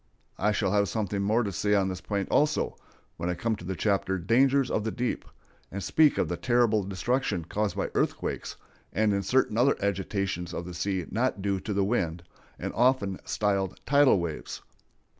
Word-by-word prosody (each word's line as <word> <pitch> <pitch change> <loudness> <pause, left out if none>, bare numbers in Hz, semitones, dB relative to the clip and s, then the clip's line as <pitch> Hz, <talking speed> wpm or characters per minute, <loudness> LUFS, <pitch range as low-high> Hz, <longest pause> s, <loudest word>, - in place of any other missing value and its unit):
I 105 +2 +2
shall 100 -2 0
have 100 -1 +2
something 105 -2 -2
more 110 +4 +2
to 100 - -2
say 105 +4 +1
on 95 -1 +2
this 95 -1 -4
point, 100 -2 -2
also, 150 +1 +2 0.4
when 85 +2 -2
I 90 - -1
come 110 +5 -1
to - - -11
the 95 +2 -3
chapter 95 -1 0
"Dangers 130 +8 +3
of 105 - 0
the 110 - -1
Deep," 120 +2 -2 0.5
and 100 0 -5
speak 155 -2 +4
of - - +1
the 90 - -3
terrible 120 -3 +2
destruction 100 0 -1
caused 105 +4 -1
by - - -2
earthquakes, - - -2 0.4
and 110 -1 +2
in 100 - +1
certain 115 +2 +1
other 135 +3 +4
agitations 95 -3 -2
of 85 - -4
the 90 - -7
sea 90 +1 -2
not 115 -2 0
due 100 -1 0
to 105 - -5
the 100 -1 +1
wind, 85 -6 -1 0.3
and - - -4
often 120 -6 +2
styled 100 -2 -1
"tidal 140 -3 +5
waves." 85 -3 -5
100 Hz, 190 wpm, -28 LUFS, 95-115 Hz, 0.5 s, tidal